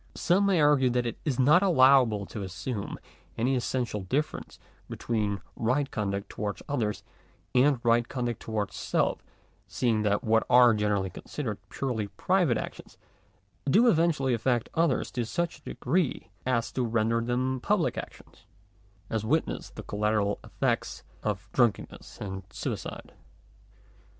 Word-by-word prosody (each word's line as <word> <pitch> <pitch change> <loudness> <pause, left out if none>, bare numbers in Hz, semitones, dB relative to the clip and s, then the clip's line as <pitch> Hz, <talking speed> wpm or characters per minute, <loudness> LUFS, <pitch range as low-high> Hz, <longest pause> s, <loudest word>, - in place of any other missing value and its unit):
Some 195 +3 +2
may 190 -4 +3
argue 145 -4 +4
that 125 0 0
it 120 - -4
is 135 -5 -1
not 150 +8 +6
allowable 130 - +5
to 105 - -7
assume 100 +3 -5 0.4
any 125 +4 +1
essential 120 -4 -2
difference 140 +12 -3 0.3
between 105 -4 -2
right 135 +5 0
conduct 100 -2 -2
towards 105 -1 -5
others 110 -7 -2 0.5
and 130 +1 +4
right 120 0 +3
conduct 120 -3 -3
towards 105 -3 -3
self, - - 0 0.4
seeing 115 -3 0
that 105 -1 +1
what 110 0 +3
are 125 -1 +7
generally 105 -3 0
considered 115 -9 -5
purely 120 -6 -2
private 180 - +1
actions, - - -8 0.7
do 225 - +5
eventually 155 - +2
affect 120 0 0
others 165 -5 +1
to 120 - -2
such 170 +7 -2
a - - -33
degree, 155 +4 -1 0.2
as 115 -2 0
to 130 - -1
render 115 0 +1
them 130 +2 -1
public - - +1
actions; - - -10 0.6
as 110 0 -2
witness 155 +9 -1
the - - -9
collateral 105 -1 0
effects - - -2 0.2
of 100 -2 -3
drunk 120 -5 +4
enness - - -12
or 95 -2 -5
suicide. - - -5
120 Hz, 140 wpm, -28 LUFS, 105-135 Hz, 0.7 s, are